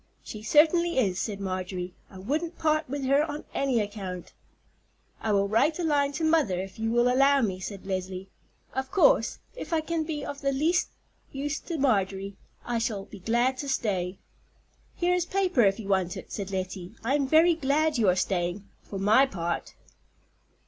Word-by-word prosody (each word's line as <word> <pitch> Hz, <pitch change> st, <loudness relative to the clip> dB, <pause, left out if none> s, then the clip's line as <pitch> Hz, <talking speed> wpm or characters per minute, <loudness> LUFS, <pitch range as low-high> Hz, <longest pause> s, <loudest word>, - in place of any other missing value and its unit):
"She 215 Hz, -, -8 dB
certainly 325 Hz, +8 st, +4 dB
is," 195 Hz, -8 st, +2 dB
said 205 Hz, -3 st, -3 dB
Marjorie. 185 Hz, -1 st, -4 dB, 0.2 s
"I 190 Hz, -, -12 dB
wouldn't 305 Hz, -, -2 dB
part 310 Hz, -2 st, +1 dB
with 280 Hz, 0 st, -3 dB
her 275 Hz, +3 st, +4 dB
on 300 Hz, -1 st, -5 dB
any 265 Hz, -4 st, +1 dB
account." 200 Hz, -4 st, -5 dB, 0.9 s
"I 220 Hz, -, 0 dB
will 200 Hz, -1 st, +2 dB
write 230 Hz, +10 st, +2 dB
a 355 Hz, -, -2 dB
line 285 Hz, -3 st, +2 dB
to 325 Hz, -, -3 dB
mother 315 Hz, -, +2 dB
if 190 Hz, +2 st, -7 dB
you 225 Hz, 0 st, 0 dB
will 240 Hz, +1 st, +3 dB
allow 275 Hz, +2 st, +4 dB
me," 190 Hz, -5 st, -1 dB
said 195 Hz, +1 st, -7 dB
Leslie. 185 Hz, 0 st, -4 dB, 0.5 s
"Of 265 Hz, 0 st, -3 dB
course, -, -, +4 dB, 0.2 s
if -, -, -7 dB
I 320 Hz, -, +2 dB
can 325 Hz, 0 st, -2 dB
be 305 Hz, -2 st, -4 dB
of 285 Hz, -1 st, -6 dB
the 275 Hz, -, +1 dB
least 320 Hz, +6 st, +2 dB, 0.4 s
use 290 Hz, +3 st, -3 dB
to 335 Hz, -, -5 dB
Marjorie, 195 Hz, -7 st, 0 dB, 0.3 s
I 240 Hz, -1 st, -1 dB
shall 210 Hz, -4 st, -2 dB
be 200 Hz, -, -12 dB
glad 240 Hz, +6 st, +1 dB
to 285 Hz, -, -4 dB
stay." 190 Hz, -7 st, -1 dB, 0.8 s
"Here 355 Hz, +1 st, +1 dB
is 355 Hz, -1 st, 0 dB
paper, 370 Hz, -8 st, +2 dB
if 195 Hz, -1 st, +3 dB
you 210 Hz, -, -7 dB
want 185 Hz, -2 st, +1 dB
it," -, -, -10 dB
said 200 Hz, -2 st, -4 dB
Lettie. 185 Hz, 0 st, -5 dB
"I 245 Hz, +4 st, +1 dB
am 285 Hz, -2 st, +1 dB
very 320 Hz, +4 st, +5 dB
glad 300 Hz, -1 st, +1 dB
you 210 Hz, -4 st, +4 dB
are 180 Hz, -, +3 dB
staying, 185 Hz, +1 st, -1 dB
for 200 Hz, -, -7 dB
my 215 Hz, +8 st, +5 dB
part." 170 Hz, -7 st, -4 dB
240 Hz, 185 wpm, -27 LUFS, 195-300 Hz, 0.9 s, very